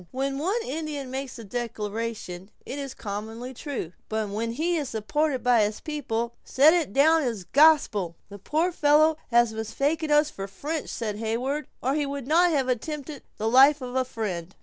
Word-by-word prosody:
when 270 Hz, +1 st, -2 dB
one 385 Hz, +10 st, 0 dB
Indian 290 Hz, -3 st, -4 dB
makes 265 Hz, 0 st, -5 dB
a 230 Hz, -, -8 dB
declaration 215 Hz, -4 st, -4 dB, 0.2 s
it 280 Hz, -, -5 dB
is 275 Hz, -2 st, -6 dB
commonly 225 Hz, +4 st, -6 dB
true; 250 Hz, -, -5 dB, 0.2 s
but 220 Hz, -1 st, -1 dB
when 225 Hz, +3 st, -2 dB
he 330 Hz, +7 st, 0 dB
is 295 Hz, -5 st, -2 dB
supported 265 Hz, +6 st, -1 dB
by 245 Hz, -2 st, +4 dB
his 210 Hz, 0 st, 0 dB
people, 235 Hz, -6 st, -3 dB
set 295 Hz, +4 st, +5 dB
it 335 Hz, -, +1 dB
down 315 Hz, +6 st, +5 dB
as 230 Hz, -8 st, -2 dB
gospel!" 245 Hz, -, +4 dB
"The 200 Hz, 0 st, -10 dB
poor 320 Hz, -, 0 dB
fellow 310 Hz, 0 st, +4 dB
has 235 Hz, -2 st, +4 dB
mistaken 280 Hz, +9 st, -1 dB
us 295 Hz, 0 st, +4 dB
for 195 Hz, 0 st, -6 dB
French," 295 Hz, +11 st, -4 dB
said 215 Hz, -3 st, -3 dB
Heyward; 245 Hz, +7 st, -2 dB, 0.2 s
"or 265 Hz, +2 st, +1 dB
he 295 Hz, -1 st, 0 dB
would 280 Hz, -2 st, -5 dB
not 340 Hz, +5 st, +4 dB
have 280 Hz, -5 st, +1 dB
attempted 285 Hz, +3 st, -3 dB, 0.2 s
the 220 Hz, -, -1 dB
life 270 Hz, +5 st, +6 dB
of 250 Hz, -1 st, -6 dB
a 260 Hz, -, +3 dB
friend." 195 Hz, -8 st, -5 dB
260 Hz, 180 wpm, -26 LUFS, 220-300 Hz, 0.2 s, life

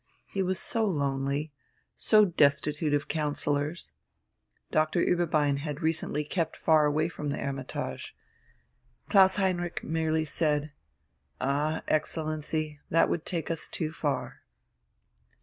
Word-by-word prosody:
He 195 Hz, -, -3 dB
was 185 Hz, 0 st, 0 dB
so 230 Hz, +3 st, -1 dB
lonely, 140 Hz, -4 st, -1 dB, 0.4 s
so 215 Hz, -1 st, +5 dB
destitute 150 Hz, -2 st, +2 dB
of 145 Hz, -, -2 dB
counsellors. 150 Hz, +1 st, -2 dB, 0.8 s
Dr. 155 Hz, +2 st, +2 dB
Ueberbein 155 Hz, -5 st, +2 dB
had 150 Hz, +2 st, -5 dB
recently 160 Hz, -2 st, 0 dB
kept 160 Hz, +1 st, -2 dB
far 155 Hz, -2 st, +4 dB
away 155 Hz, +2 st, +1 dB
from 150 Hz, -4 st, -5 dB
the 140 Hz, -, -2 dB
"Hermitage."... 135 Hz, -1 st, -5 dB, 0.9 s
Klaus 190 Hz, -2 st, +6 dB
Heinrich 180 Hz, -3 st, -1 dB
merely 160 Hz, 0 st, 0 dB
said: 150 Hz, -1 st, 0 dB, 0.7 s
"Ah, 145 Hz, +4 st, 0 dB
Excellency, 155 Hz, -1 st, -1 dB
that 165 Hz, -, +4 dB
would 165 Hz, -, -2 dB
take 170 Hz, -2 st, -2 dB
us 165 Hz, -2 st, -3 dB
too 155 Hz, -3 st, -3 dB
far." 145 Hz, -5 st, -3 dB
155 Hz, 115 wpm, -29 LUFS, 145-165 Hz, 0.9 s, Klaus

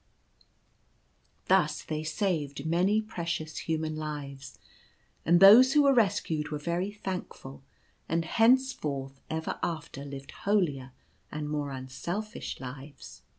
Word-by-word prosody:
Thus -, -, +2 dB
they 155 Hz, 0 st, -4 dB
saved 155 Hz, -4 st, -2 dB
many 185 Hz, +7 st, +2 dB
precious 165 Hz, -6 st, -4 dB
human 160 Hz, -1 st, -2 dB
lives, 145 Hz, -3 st, -6 dB, 0.7 s
and 170 Hz, +1 st, +6 dB
those 230 Hz, +8 st, +9 dB
who 295 Hz, -, +5 dB
were 280 Hz, -1 st, +5 dB
rescued 180 Hz, -, +1 dB
were 150 Hz, -, -3 dB
very 170 Hz, +5 st, -2 dB
thankful, 185 Hz, -9 st, -7 dB, 0.5 s
and 165 Hz, 0 st, 0 dB
henceforth 160 Hz, -, +1 dB
ever 160 Hz, 0 st, -3 dB
after 160 Hz, -4 st, -4 dB
lived 140 Hz, -1 st, -8 dB
holier 145 Hz, -11 st, -1 dB, 0.4 s
and 150 Hz, 0 st, -4 dB
more 150 Hz, -1 st, -2 dB
unselfish 155 Hz, -, -5 dB
lives. 135 Hz, +2 st, -10 dB
160 Hz, 110 wpm, -29 LUFS, 140-195 Hz, 0.7 s, those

